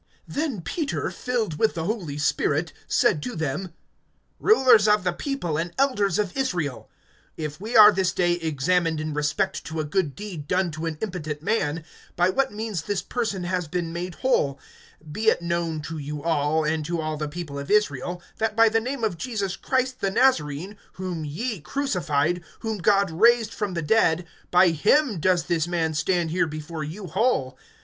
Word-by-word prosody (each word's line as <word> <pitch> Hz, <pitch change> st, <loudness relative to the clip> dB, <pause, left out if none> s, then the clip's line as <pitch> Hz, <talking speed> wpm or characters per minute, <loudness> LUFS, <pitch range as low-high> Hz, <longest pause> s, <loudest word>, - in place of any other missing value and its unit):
(8)Then 280 Hz, -, -3 dB
Peter, 300 Hz, -, -2 dB
filled 225 Hz, -11 st, -2 dB
with 220 Hz, -, +2 dB
the 165 Hz, -, -2 dB
Holy 175 Hz, -7 st, -3 dB
Spirit, 150 Hz, +2 st, 0 dB
said 150 Hz, -, +2 dB
to 245 Hz, -, -5 dB
them: 160 Hz, +4 st, -3 dB, 0.7 s
Rulers 255 Hz, -, +5 dB
of 210 Hz, -2 st, +4 dB
the 180 Hz, -1 st, 0 dB
people, 175 Hz, -, -3 dB
and 170 Hz, +1 st, -3 dB
elders 230 Hz, -9 st, +2 dB
of 205 Hz, -4 st, -1 dB
Israel; 175 Hz, -, -2 dB, 0.5 s
(9)if 155 Hz, -1 st, -5 dB
we 225 Hz, +4 st, 0 dB
are 210 Hz, -1 st, +10 dB
this 190 Hz, -2 st, +1 dB
day 175 Hz, -1 st, +2 dB
examined 165 Hz, 0 st, 0 dB
in 155 Hz, 0 st, -3 dB
respect 150 Hz, +1 st, -1 dB
to 160 Hz, 0 st, -4 dB
a -, -, 0 dB
good 150 Hz, -2 st, -1 dB
deed 185 Hz, -8 st, -7 dB
done 180 Hz, 0 st, +1 dB
to 155 Hz, +2 st, -4 dB
an 160 Hz, -2 st, -4 dB
impotent 155 Hz, -7 st, -4 dB
man, 165 Hz, -6 st, 0 dB, 0.3 s
by 180 Hz, +1 st, +3 dB
what 270 Hz, +5 st, +1 dB
means 210 Hz, -4 st, -3 dB
this 190 Hz, +4 st, -2 dB
person 215 Hz, -7 st, -2 dB
has 180 Hz, -1 st, -2 dB
been 170 Hz, 0 st, -3 dB
made 175 Hz, +1 st, -4 dB
whole; 145 Hz, -, +1 dB, 0.5 s
(10)be 215 Hz, +9 st, -4 dB
it -, -, +4 dB
known 170 Hz, -2 st, -1 dB
to 160 Hz, +1 st, -6 dB
you 145 Hz, 0 st, -5 dB
all, 160 Hz, -1 st, +1 dB
and 155 Hz, 0 st, 0 dB
to 170 Hz, +2 st, -2 dB
all 155 Hz, 0 st, -2 dB
the 150 Hz, 0 st, -3 dB
people 145 Hz, -3 st, -6 dB
of 140 Hz, -, -7 dB
Israel, 175 Hz, -4 st, +1 dB, 0.2 s
that 220 Hz, -1 st, 0 dB
by 225 Hz, 0 st, +6 dB
the 225 Hz, +1 st, +2 dB
name 255 Hz, +1 st, -4 dB
of 190 Hz, -7 st, -1 dB
Jesus 200 Hz, -7 st, -2 dB
Christ 260 Hz, 0 st, -1 dB
the 195 Hz, -, +1 dB
Nazarene, 190 Hz, -, +1 dB, 0.2 s
whom 180 Hz, -4 st, -4 dB
ye 205 Hz, -, -3 dB
crucified, 175 Hz, -, 0 dB, 0.2 s
whom 220 Hz, -2 st, -3 dB
God 200 Hz, 0 st, +3 dB
raised 230 Hz, +5 st, +4 dB
from 205 Hz, -4 st, -3 dB
the 170 Hz, -, -2 dB
dead, 170 Hz, -1 st, +3 dB, 0.2 s
by 180 Hz, 0 st, +6 dB
him 215 Hz, -, +2 dB
does 180 Hz, +1 st, +2 dB
this 165 Hz, 0 st, 0 dB
man 165 Hz, -2 st, 0 dB
stand 165 Hz, +2 st, 0 dB
here 175 Hz, 0 st, +1 dB
before 155 Hz, +1 st, -6 dB
you 175 Hz, +7 st, -6 dB
whole. 165 Hz, -, 0 dB
175 Hz, 185 wpm, -25 LUFS, 155-215 Hz, 0.7 s, are